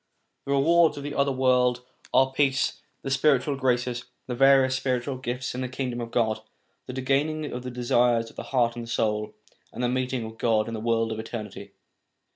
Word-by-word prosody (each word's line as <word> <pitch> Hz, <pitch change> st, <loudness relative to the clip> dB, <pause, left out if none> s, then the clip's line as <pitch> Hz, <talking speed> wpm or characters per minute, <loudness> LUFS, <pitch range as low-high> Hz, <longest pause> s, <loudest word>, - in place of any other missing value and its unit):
The 140 Hz, -, -3 dB
rewards 160 Hz, +2 st, +4 dB
of 140 Hz, -, -6 dB
the 145 Hz, 0 st, -4 dB
other 140 Hz, 0 st, +1 dB
world 125 Hz, -1 st, +2 dB, 0.3 s
are 130 Hz, 0 st, +4 dB
peace, 135 Hz, -1 st, +1 dB, 0.2 s
the 135 Hz, -, -3 dB
spiritual 140 Hz, 0 st, +2 dB
graces, 125 Hz, -2 st, 0 dB, 0.2 s
the 125 Hz, -, -4 dB
various 135 Hz, +1 st, +5 dB
spiritual 130 Hz, 0 st, -1 dB
gifts 125 Hz, 0 st, -4 dB
in 125 Hz, -, -4 dB
the 130 Hz, -, -3 dB
Kingdom 125 Hz, -2 st, -3 dB
of 115 Hz, -, -5 dB
God, 110 Hz, -2 st, 0 dB, 0.5 s
the 125 Hz, -, -6 dB
gaining 140 Hz, +4 st, 0 dB
of 125 Hz, -, -4 dB
the 125 Hz, -, -6 dB
desires 120 Hz, -1 st, +1 dB
of -, -, -25 dB
the -, -, -5 dB
heart 120 Hz, -3 st, +2 dB
and 120 Hz, -1 st, -6 dB
the -, -, -12 dB
soul, 105 Hz, -2 st, -1 dB, 0.4 s
and 125 Hz, -, -5 dB
the -, -, +3 dB
meeting 130 Hz, -1 st, -1 dB
ot 110 Hz, 0 st, -10 dB
God 110 Hz, -2 st, +2 dB
in 115 Hz, -, -5 dB
the 110 Hz, -, -3 dB
world 115 Hz, 0 st, 0 dB
of 110 Hz, -, -4 dB
eternity. 110 Hz, -2 st, -7 dB
125 Hz, 200 wpm, -26 LUFS, 120-135 Hz, 0.5 s, various